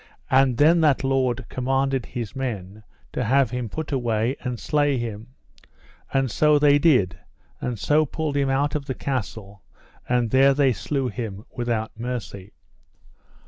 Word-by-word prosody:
And 130 -2 +4
then 165 +4 +5
that 145 -4 +3
lord 130 -2 0
commanded 135 0 -1
his 115 -5 -6
men 110 -6 -5 0.3
to 125 - -1
have 130 +1 +2
him 125 -2 -3 0.2
away 120 -1 0
and 125 -3 -4
slay 145 -2 +1
him; 115 +1 -6 0.8
and 135 -3 +1
so 150 +5 +4
they 145 0 +5
did, 115 - +3 0.4
and 125 -2 -3
so 150 +7 +2
pulled 155 0 -3
him 140 -1 +1
out 140 +2 +1
of 150 -2 -3
the 130 -2 -4
castle, 105 -6 -5 0.5
and 120 -2 +1
there 135 +1 +5
they 135 -3 +3
slew 125 +6 -2
him 110 -4 -6
without 115 -3 -3
mercy. 115 -5 -6
130 Hz, 145 wpm, -23 LUFS, 115-140 Hz, 0.8 s, then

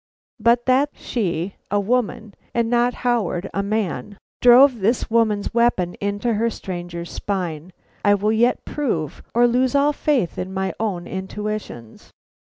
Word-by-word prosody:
But 235 +2 +3
that 265 +3 +3
she, 190 -5 -3
a 205 - +1
woman, 220 -1 -1 0.2
and 235 0 +1
not 240 +1 +2
Howard, 205 -6 0
a 200 - 0
man, 205 -1 -2 0.2
drove 250 +1 +7
this 225 +4 0
woman's 220 -3 +1
weapon 235 -7 +2
into 205 +3 -1
the 230 +1 +2
stranger's 175 -4 -6
spine, 180 -4 -4 0.3
I 205 0 +5
will 210 +2 0
yet 235 +3 +2
prove, 180 - -2
or 240 +1 +5
lose 250 +3 +2
all 285 +1 +3
faith 280 - 0
in 185 +1 -4
my 190 0 -1
own 195 -6 -2
intuitions. 190 - -6
215 Hz, 145 wpm, -21 LUFS, 190-240 Hz, 0.3 s, drove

